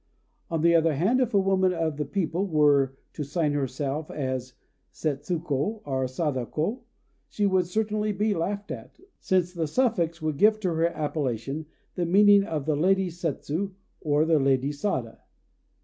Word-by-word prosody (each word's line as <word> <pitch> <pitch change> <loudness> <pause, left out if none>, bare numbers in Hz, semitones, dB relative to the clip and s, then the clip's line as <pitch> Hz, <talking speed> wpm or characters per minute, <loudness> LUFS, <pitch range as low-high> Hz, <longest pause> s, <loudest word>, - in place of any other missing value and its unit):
On 165 -2 -1
the 170 0 +5
other 165 -2 +3
hand, 200 - +2
if 250 -2 +1
a - - +6
woman 190 -1 +2
of 165 -3 -1
the 150 - -2
people 180 +4 -1
were 145 -5 +3 0.2
to 150 - -4
sign 150 +1 0
herself 140 +2 -2
as 130 -3 -4 0.4
Setsuko 155 +6 -2
or 130 -2 -1
Sadako, 150 - -2 0.5
she 205 - -1
would 190 -3 +2
certainly 215 +2 -1
be 210 +2 0
laughed 200 +4 -3
at, - - -8 0.2
since 180 -1 +1
the 165 -3 -2
suffix 170 - +1
would 155 -3 -2
give 215 +5 +4
to 180 -4 0
her 165 +1 +2
appellation 145 -3 -3 0.3
the 175 -2 -1
meaning 200 +2 +6
of 155 -7 -3
"the 155 -1 +1
Lady 190 +4 +2
Setsu," 170 +3 -3 0.2
or 150 0 +2
"the 160 -2 +3
Lady 135 0 +2
Sada." 135 - -3
165 Hz, 160 wpm, -26 LUFS, 145-190 Hz, 0.5 s, a